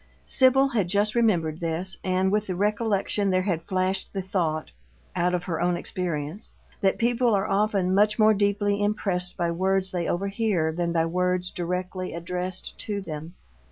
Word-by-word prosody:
Sibyl 265 +1 +5
had 210 -8 0
just 205 +3 +1
remembered 175 -10 +1
this, 170 +2 -1
and 185 +1 +1
with 210 0 0
the 185 - -2
recollection 205 0 0
there 185 0 +2
had 175 -4 -1
flashed 185 +1 -1
the 195 - -2
thought 165 -6 -1 0.4
out 180 +1 +1
of 175 - -3
her 170 -4 -3
own 175 0 +1
experience 170 +1 -4 0.3
that 195 -2 +2
people 240 -1 +2
are 195 0 +1
often 195 -2 +1
much 210 +2 +3
more 215 -1 +6
deeply 205 0 +1
impressed 195 -4 -1
by 170 -1 0
words 190 +2 0
they 175 -2 -2
overhear 195 -3 0
than 170 +1 -1
by 165 -1 +2
words 180 +1 0
directly 180 +1 -3
addressed 180 +2 -5
to 205 -2 -3
them. 165 -2 -7
185 Hz, 165 wpm, -25 LUFS, 175-205 Hz, 0.4 s, more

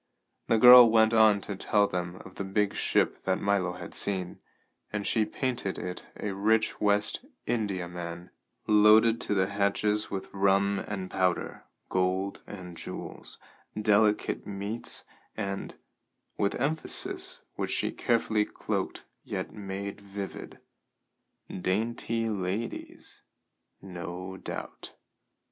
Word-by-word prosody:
The 115 - +3
girl 125 +1 +10
went 110 0 +4
on 110 -2 +5
to 100 - -5
tell 105 +2 +2
them 90 -2 -3
of 95 - -11
the - - -2
big 100 +1 0
ship - - +1
that - - +1
Milo 100 -3 +1
had 90 -1 -9
seen, 95 -3 -3 0.5
and 105 -1 -3
she 110 -2 +2
painted 120 -8 -3
it 90 0 -6
a 105 - -2
rich 110 +3 +1
West 105 - +1 0.2
Indiaman, 90 -5 -3 0.3
loaded 110 +2 +6
to 105 - -1
the 95 -1 +3
hatches 100 +2 0
with 95 -1 -5
rum 100 0 +2
and 95 -3 -5
powder, 90 -1 -1 0.2
gold 95 +1 0
and 90 -3 -9
jewels, - - -8 0.4
delicate 105 0 +2
meats 100 +3 -4 0.3
and 100 -2 -4 0.6
with 100 - 0
emphasis 150 +6 0
which - - -3
she - - -1
carefully 110 -2 +1
cloaked - - -4 0.2
yet - - -5
made 100 0 -6
vivid 100 -1 -7 1.0
dainty 115 +4 -1
ladies, 100 +2 -4 0.6
no 90 0 -6
doubt. - - -7
100 Hz, 120 wpm, -29 LUFS, 95-110 Hz, 1.0 s, girl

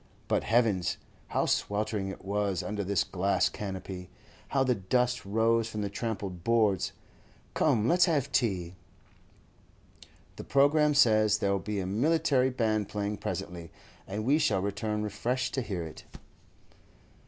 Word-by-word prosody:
But - - +1
heavens! 110 -6 +2 0.3
how - - 0
sweltering 105 -1 -1
it 95 0 -8
was 100 -2 -1
under 105 -1 -3
this 100 -1 +1
glass 95 +2 +1
canopy. 95 -2 -6 0.4
How 135 -1 +1
the 130 -1 +2
dust 125 +4 0
rose 115 +2 +2
from 105 -1 -4
the 100 - -3
trampled 100 -5 -4
boards! 110 -5 +2 0.6
Come, 120 -8 +2
let's 175 +4 +5
have 145 -6 0
tea. 95 -10 0 1.6
The - - -6
programme 150 +2 +3
says 110 -6 +5
there'll 100 0 0
be 105 +1 -3
a 95 - -2
military 135 - +2
band 110 -5 0
playing 105 0 -2
presently, 85 -3 -5 0.4
and 105 +3 -4
we 145 +5 +3
shall 105 -11 +1
return 105 +1 -2
refreshed 125 +5 -2
to 135 - 0
hear 95 -7 -4
it. 80 - -9
105 Hz, 140 wpm, -29 LUFS, 100-125 Hz, 1.6 s, let's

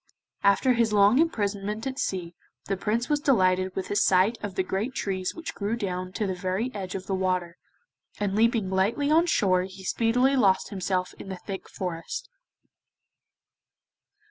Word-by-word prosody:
After 200 +6 +4
his 230 -2 +2
long 205 +5 +5
imprisonment 210 -7 -1
at 265 0 -4
sea 180 -3 -2 0.3
the 195 - -1
Prince 220 +5 -1
was 295 -1 +1
delighted 185 - +2
with 190 - -4
the - - -2
sight 195 +2 +4
of 205 -3 -5
the 190 - +1
great 205 +8 -3
trees 185 -2 -2
which 330 0 -6
grew 205 +2 -2
down 185 -4 -3
to 215 - -1
the 190 - -1
very 185 +7 -2
edge 190 -3 -5
of 190 -1 -5
the 195 - -3
water, 185 -2 -1 0.6
and 200 -1 -1
leaping 225 -3 +2
lightly 215 +10 +1
on 330 +3 +4
shore 185 - +3
he 190 0 -11
speedily 245 +7 +2
lost 195 -7 +3
himself 185 -2 -2
in - - -8
the 190 - -5
thick 190 +1 -7
forest. 170 -3 -5
200 Hz, 170 wpm, -26 LUFS, 185-230 Hz, 0.6 s, long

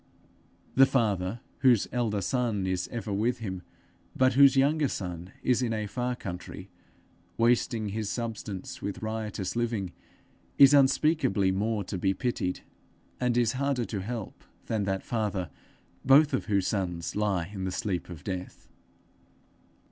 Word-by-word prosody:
The 135 +1 +7
father, 105 -4 0 0.2
whose 120 -6 +4
elder 110 -5 0
son 115 -3 0
is 95 -1 -1
ever 110 -4 -4
with 115 +5 +1
him, 95 -6 -5 0.5
but 130 0 +3
whose 140 +1 +6
younger 145 +2 +3 0.6
is 125 0 +2
in 120 -3 0
a 110 -1 -2
far 125 +4 -2
country, 95 -2 -8 0.7
wasting 115 -2 +2
his 105 0 -3
substance 110 -5 -5
with 100 +1 -5
riotous 110 -3 -3
living, 115 -6 -1 0.7
is 140 0 +8
unspeakably 135 - +3
more 105 +2 -1
to 95 0 -5
be 95 +1 +1
pitied, 120 -6 -2 0.6
and 125 -1 +1
is 120 -2 +3
harder 135 -2 -1
to 100 -4 -4
help, 110 +1 -6 0.2
than 110 -3 -1
that 95 -1 -1
father 105 - -2 0.5
both 140 +3 +6
of 130 - 0
whose 100 -3 +1
sons 90 -5 -2
lie 100 -4 0
in 95 -2 -4
the 95 - -2
sleep 95 -4 -3
of 85 -4 -9
death. 90 -1 -6
110 Hz, 140 wpm, -28 LUFS, 95-125 Hz, 0.7 s, is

